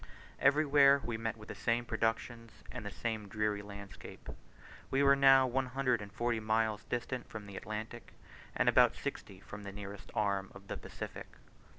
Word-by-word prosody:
Everywhere 140 -1 +5
we 120 +1 -3
met 115 0 -3
with 105 - -12
the - - -4
same 115 +4 0
productions, 115 0 -2
and - - -6
the 105 - -4
same 110 -1 -3
dreary 105 0 -1
landscape. 100 -1 -10 0.6
We 135 +1 +2
were 140 0 +7
now 135 -1 +7
one 130 +1 0
hundred 125 -3 +1
and 100 -1 -8
forty 120 +2 0
miles 110 0 0
distant 125 0 -3
from 110 -2 -7
the 100 -1 -10
Atlantic 110 +3 -6 0.4
and - - +1
about - - +6
sixty 95 -1 -6
from 100 +1 -9
the 100 -1 -7
nearest 100 0 -8
arm 100 -2 0
of 100 0 -13
the - - -3
Pacific. - - -7
110 Hz, 175 wpm, -33 LUFS, 105-125 Hz, 0.6 s, were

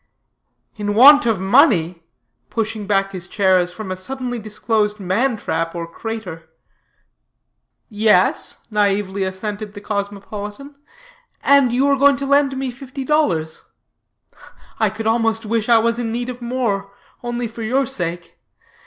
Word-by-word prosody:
"In 205 -1 -2
want 280 +2 +8
of 220 -5 +1
money!" 190 - +3 0.5
pushing 220 -2 -3
back 195 -1 +1
his 185 -2 -6
chair 190 -3 +3
as 175 0 -1
from 190 0 -7
a - - -2
suddenly 245 +5 -4
disclosed 215 0 -1
man 220 +7 0
trap 165 -3 -3
or 170 -1 -4
crater. 175 -3 -7 1.4
"Yes," 210 -4 +2
naïvely 200 -2 0
assented 205 +2 -5
the - - -6
cosmopolitan, 205 +6 -6 0.7
"and 280 -3 +5
you 260 +3 +2
are 280 0 +3
going 280 0 +4
to 280 - -4
loan 280 0 +3
me 265 -1 -3
fifty 265 +1 -8
dollars. 180 - 0 1.2
I 220 - +3
could 215 +2 -7
almost 225 0 +1
wish 225 +1 -1
I 235 - +7
was 230 +1 +1
in 230 -2 -2
need 240 +2 -3
of 250 0 -7
more, 235 -5 -2 0.3
only 240 0 -3
for 230 +1 -10
your 255 +5 +1
sake. 175 -9 -4
220 Hz, 145 wpm, -19 LUFS, 195-245 Hz, 1.4 s, want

